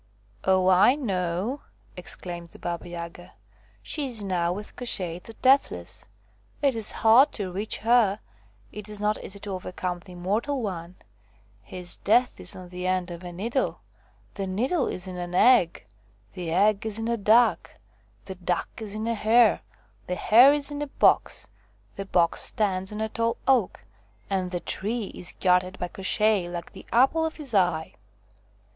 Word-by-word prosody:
" 105 - -34
Oh, 185 -1 +3
I 190 +8 +6
know! 195 - -2 0.2
' - - -32
exclaimed 175 -1 -7
the - - -15
Baba 175 0 -5
Yaga, 170 0 -8 0.3
" - - -32
She 295 -3 -2
is 230 -5 -2
now 175 -3 0
with 205 +3 -7
Koshchei 180 -8 -2
the 225 - -12
Deathless. 270 +2 +2 0.5
It 275 -4 +2
is 225 -2 +1
hard 250 +7 +7
to 195 -4 -4
reach 200 +4 -3
her; 225 -3 +3 0.5
it 210 0 -7
is 210 -1 -3
not 210 +1 -1
easy 200 - -5
to 205 - -5
overcome 180 -1 -4
the 180 +1 -14
immortal 220 +10 -1
one: 180 -3 -5 0.7
his 175 - -5
death 245 +4 +2
is - - -8
on 185 -1 -10
the 180 0 -5
end 185 -1 0
of 170 +1 -8
a 175 - -7
needle; 230 +9 -2 0.5
the 195 -1 -4
needle 255 - 0
is 180 - -4
in 185 -1 -6
an 175 0 -5
egg; 210 -6 +4 0.5
the 180 -3 -5
egg 200 +4 +3
is 220 -1 -3
in 225 0 -3
a 235 - +1
duck; 230 +3 +3 0.5
the 190 - -6
duck 180 -1 -2
is 215 -3 -5
in 215 +1 -3
a 230 - 0
hare; 225 +1 +4 0.5
the 180 - -2
hare 240 +9 +7
is 290 0 0
in 290 0 -4
a 295 - -2
box; - - +2 0.5
the 195 - -5
box 170 -3 +2
stands 190 -2 0
on 210 +1 -5
a 220 - -1
tall 230 +1 -1
oak; 255 -8 +2 0.5
and 185 -2 0
the 180 -1 -3
tree 215 +1 -2
is 180 - -6
guarded 185 0 +2
by 180 - -3
Koshchei 195 0 +1
like 175 -1 -6
the - - -12
apple 270 +7 +4
of 320 0 -2
his 285 -6 -8
eye." 175 -5 +1
195 Hz, 175 wpm, -26 LUFS, 180-230 Hz, 0.7 s, hard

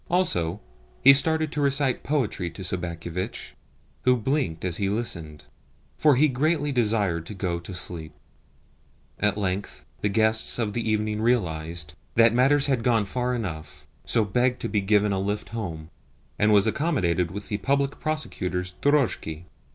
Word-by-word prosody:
Also, 100 - +1 0.4
he 135 - +10
started 155 +2 +3
to 150 - -2
recite 140 -2 +2
poetry 125 - -1
to 85 +4 -9
Sobakevitch, 85 0 -4 0.5
who 125 0 +3
blinked 115 - -1
as 90 -2 -1
he 100 -1 0
listened, 85 -9 -4 0.5
for 150 -3 +4
he 150 +5 +4
greatly 150 +2 0
desired 105 -9 +1
to 105 - -7
go 90 -3 -2
to 85 - -9
sleep. 85 -3 -3 1.1
At 105 0 +1
length 100 -1 -3
the 105 - 0
guest 110 +1 +2
of 110 -4 -1
the 115 -1 -2
evening 105 0 0
realised 85 -9 -1 0.2
that 115 0 +6
matters 135 +3 +4
had 130 -5 0
gone 115 -4 +2
far 125 +4 -1
enough, 85 -9 -6 0.2
so 115 -3 +2
begged 125 +5 +1
to - - -3
be 105 - +1
given 105 +1 +2
a 95 - 0
lift 100 +2 -2
home, 85 -9 -6 0.5
and 105 +1 +4
was 100 -2 +5
accommodated 100 - 0
with 100 +3 -7
the 105 -2 -2
Public 140 +6 0
Prosecutor's 90 -12 -3
drozhki. 125 - +1
105 Hz, 155 wpm, -25 LUFS, 90-130 Hz, 1.1 s, he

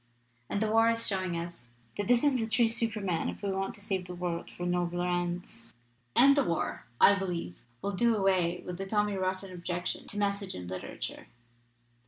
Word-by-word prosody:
And 200 - 0
the - - +1
war 225 +1 +5
is 230 0 +2
showing 185 -3 +1
us 170 -8 -7 0.2
that 205 - -2
this 240 0 +4
is 290 -2 +4
the 225 -3 0
true 225 +1 +3
Superman, 210 -7 -1
if - - -8
we 200 - 0
want 195 0 -2
to 205 - -13
save 190 -3 -2
the 180 - -6
world 175 -1 -3
for 175 - -6
nobler 175 0 0
ends. 175 -9 -3 0.4
"And 275 +3 +7
the 285 - +4
war, 170 - -2
I 200 -1 +7
believe, 175 - -4 0.2
will 200 - 0
do 230 +4 +3
away 185 -3 +2
with 180 0 -5
the 195 - -3
tommy 210 0 +1
rotten 185 0 -2
objection 175 0 -3
to 205 - -3
'message' 200 -1 -1
in 90 - -6
literature. 90 +1 -6
190 Hz, 195 wpm, -30 LUFS, 175-210 Hz, 0.4 s, And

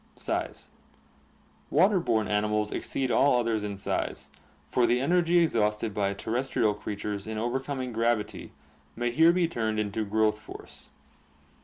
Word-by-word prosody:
Size. - - -4 0.5
— - - -34
Water 190 +2 +5
borne 110 -10 0
animals 105 0 0
exceed 130 -2 -2
all 140 -2 +4
others 115 -3 0
in 100 -1 -4
size, 70 -7 -3 0.4
for 120 -1 +2
the 125 - +2
energy 175 +5 +2
exhausted 105 -6 0
by 100 -1 0
terrestrial 120 0 0
creatures 105 0 -5
in 110 0 -4
overcoming 130 +2 -3
gravity 115 -2 -1 0.4
may 120 +1 -1
here 160 +7 +6
be 175 -1 +2
turned 110 -8 -2
into 105 +1 -1
growth 105 +1 +1
force. - - -12
110 Hz, 140 wpm, -28 LUFS, 105-130 Hz, 0.5 s, here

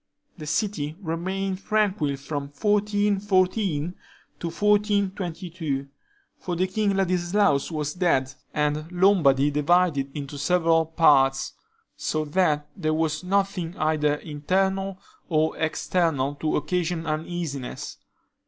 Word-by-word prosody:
The 155 -4 -9
city 155 -4 -1
remained 190 +2 -3
tranquil 195 -10 +1
from 140 +1 -4
1414 200 -2 +1 0.5
to 170 - -3
1422; 185 -6 0 0.5
for 180 -8 -3
King 195 +3 0
Ladislaus 185 -3 +2
was 150 -2 -3
dead, 135 -7 +1 0.2
and 150 +2 -1
Lombardy 165 -7 +4
divided 150 -1 +2
into 145 0 -6
several 165 +1 +3
parts; 135 -5 +3 0.4
so 155 0 -2
that 150 -2 +1
there 155 -4 0
was 155 0 -1
nothing 190 -2 -1
either 155 -1 +1
internal 190 +6 -1 0.3
or 160 -1 +2
external 160 -3 0
to 155 +2 -1
occasion 165 +2 -1
uneasiness. 155 -4 -4
165 Hz, 100 wpm, -25 LUFS, 150-190 Hz, 0.5 s, Lombardy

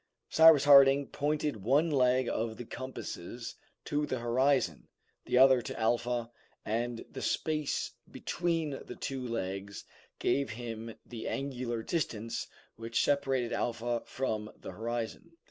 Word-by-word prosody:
Cyrus 160 -3 +8
Harding 140 -1 +7
pointed 150 -3 -1
one 140 - +2
leg 130 -2 +3
of 110 0 -2
the 120 - -7
compasses 120 -3 -6 0.3
to 150 0 -1
the 130 - -1
horizon, 120 - +1 0.4
the - - +2
other 130 -1 +7
to - - -6
Alpha, 120 +1 0 0.3
and 115 +2 -2
the 130 - -6
space 155 -2 -1 0.2
between 165 -3 -1
the - - -9
two 135 -1 -3
legs 100 -3 -4 0.3
gave 140 -2 +1
him 115 0 -6
the 115 -2 -7
angular 125 -4 -3
distance 115 -9 -2 0.3
which 115 +1 0
separated 135 -4 +1
Alpha 120 0 -1
from 110 -5 -3
the - - -8
horizon. 120 +8 -4
125 Hz, 130 wpm, -31 LUFS, 115-140 Hz, 0.4 s, Cyrus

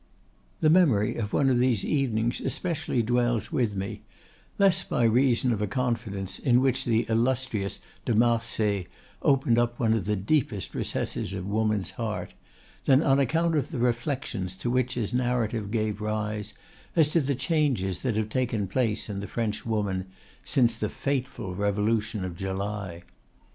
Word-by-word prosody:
The 155 - +5
memory 140 - +4
of 105 -3 -3
one 140 - +2
of 125 - +3
these 125 -5 +2
evenings 120 -5 0
especially 160 -8 -1
dwells 120 0 +1
with 115 -5 0
me, 95 0 -4 0.6
less 195 -2 +4
by 120 - 0
reason 120 +1 +3
of 105 - -3
a 105 - 0
confidence 110 -5 -2
in 125 -3 +4
which 130 -1 +1
the 115 -1 +2
illustrious 115 -4 0 0.3
de 120 - +1
Marsay 110 -4 +1 0.3
opened 130 -4 +3
up 120 0 0
one 110 -2 +3
of 110 -5 -1
the 105 +1 +1
deepest 105 - 0
recesses 95 - -2
of 95 -1 -4
woman's 105 -1 0
heart, 110 -3 -4 0.5
than 135 +2 +5
on 135 0 +4
account 165 +5 +2
of 145 -5 0
the 155 - -5
reflections 120 -6 -1
to 110 +6 -2
which 125 0 +1
his 115 -3 -2
narrative 120 -4 0
gave 110 -1 -1
rise, 105 0 -3 0.4
as 160 -3 +5
to 165 +1 +2
the 140 0 0
changes 135 - 0
that 125 -5 -1
have 110 0 -1
taken 120 -4 0
place 110 +1 0
in 100 -2 -4
the 100 - -5
French 115 -1 -3
woman 100 -4 -1 0.4
since 120 -5 +2
the 105 - -1
fateful 130 -8 -3
revolution 105 +1 0
of 90 -2 -5
July. 95 -1 -4
115 Hz, 160 wpm, -27 LUFS, 105-130 Hz, 0.6 s, The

